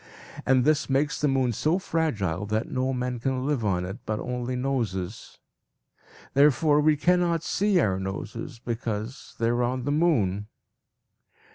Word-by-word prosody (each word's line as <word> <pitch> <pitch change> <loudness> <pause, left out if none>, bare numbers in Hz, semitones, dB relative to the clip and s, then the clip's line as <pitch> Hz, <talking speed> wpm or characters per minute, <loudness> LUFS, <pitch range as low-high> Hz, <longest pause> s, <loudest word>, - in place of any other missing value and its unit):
And 130 -1 +4
this 155 -1 +2
makes 145 +4 +1
the 150 - +3
moon 130 -3 +1
so 155 - +1
fragile 105 - -1
that 110 +2 -2
no 130 +1 0
men 125 -1 -2
can 130 +1 -1
live 140 -5 0
on 90 -3 0
it, 95 +6 -6
but 110 -1 -2
only 125 0 -3
noses. 115 -7 -3 1.0
Therefore 150 +1 +4
we 150 0 +3
cannot 170 +1 +2
see 200 -2 +2
our 95 - +1
noses, 115 +7 -5
because 115 0 -5
they 115 0 +1
are 120 +1 +1
on 125 +1 -1
the 145 - -1
moon. 110 - +1
125 Hz, 150 wpm, -26 LUFS, 110-150 Hz, 1.0 s, And